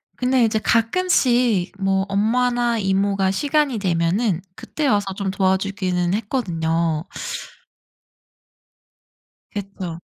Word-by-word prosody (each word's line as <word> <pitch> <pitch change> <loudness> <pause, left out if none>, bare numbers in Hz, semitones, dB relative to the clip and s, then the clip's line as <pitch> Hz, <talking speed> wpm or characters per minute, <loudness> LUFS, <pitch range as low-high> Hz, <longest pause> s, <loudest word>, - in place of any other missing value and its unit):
근데 250 -1 +2
이제 220 0 +1
가끔씩 240 - +2
뭐 195 0 +1
엄마나 240 +3 +1
이모가 195 0 +1
시간이 285 +3 +1
되면은 180 +2 +1
그때 300 -2 -3
와서 205 -4 +1
좀 195 -1 -2
도와주기는 190 -2 0
했거든요. 170 - -1 2.5
그쵸. 190 -4 -6
200 Hz, 215 characters per minute, -21 LUFS, 185-240 Hz, 2.5 s, 근데